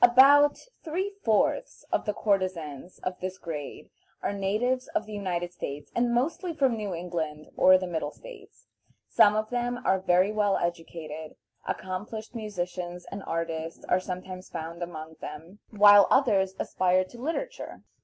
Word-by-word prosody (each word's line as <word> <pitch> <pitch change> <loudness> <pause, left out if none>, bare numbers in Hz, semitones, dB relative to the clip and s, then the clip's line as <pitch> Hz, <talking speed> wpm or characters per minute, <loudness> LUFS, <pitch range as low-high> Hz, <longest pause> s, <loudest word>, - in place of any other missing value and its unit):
About 275 +4 +7 0.3
three 370 +5 -2
fourths 225 - +1
of - - +1
the 210 - 0
courtesans 185 -6 -1
of 185 0 -3
this 185 0 -4
grade 150 -6 -7 0.3
are - - 0
natives 220 +7 0
of 215 - +1
the 215 - -9
United 175 -3 -3
States, 145 -2 -6
and 240 0 +2
mostly 325 +8 0
from 270 -6 +2
New 205 -4 -3
England 165 -3 -4
or 185 0 +7
the 185 - -3
Middle 160 -4 -2
States. 425 - -14 0.4
Some 210 0 +5
of 215 +1 -1
them 245 0 -1
are 190 - +3
very 185 +2 +3
well 210 -2 +2
educated; 160 -2 -5 0.3
accomplished 210 +5 -5
musicians 180 -5 -4
and 195 - -5
artists 165 0 -3
are 180 - +3
sometimes 185 0 -7
found 165 +2 -6
among 160 -2 -6
them, 165 +7 -9
while 205 -2 +8
others 200 -8 +3
aspire 185 0 +2
to 235 +6 -12
literature. - - -4
190 Hz, 150 wpm, -28 LUFS, 175-230 Hz, 0.4 s, while